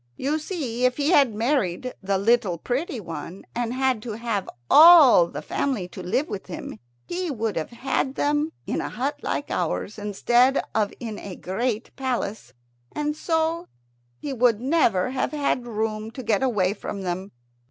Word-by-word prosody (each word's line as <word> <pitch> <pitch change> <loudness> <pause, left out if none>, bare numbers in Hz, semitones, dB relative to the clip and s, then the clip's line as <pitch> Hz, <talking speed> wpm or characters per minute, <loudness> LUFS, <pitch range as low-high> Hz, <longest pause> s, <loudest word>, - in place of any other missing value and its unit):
"You 295 +4 -1
see, 280 -8 -4
if 255 0 +3
he 295 +3 +1
had 275 - +4
married 235 -2 0
the 195 0 0
little 200 -3 +2
pretty 255 - -3
one, 165 0 -8
and 240 -1 -2
had 260 -3 0
to 225 -1 -5
have 225 -3 -3 0.2
all 300 - +8
the - - -7
family 250 -10 -2
to 185 - -9
live 235 - 0
with 200 - -6
him, 170 - -7 0.3
he 360 0 -3
would 225 -6 -2
have 160 - -3
had 265 +2 -2
them 295 +2 +1
in - - -2
a - - -4
hut 275 +4 -3
like - - -3
ours 210 +2 -2
instead 240 +6 +3
of 210 -2 +1
in 220 -4 -6
a 190 -3 -7
great 225 +4 -3
palace, 240 - -3 0.4
and 300 0 -2
so 325 +2 -1 0.5
he 280 - -5
would 240 -3 +3
never 255 - +2
have 265 - -2
had 280 -4 0
room 215 -1 -2
to 260 - -7
get 220 -1 +1
away 205 -8 +1
from 200 -2 -6
them. 185 +2 -3
240 Hz, 170 wpm, -24 LUFS, 205-275 Hz, 0.5 s, all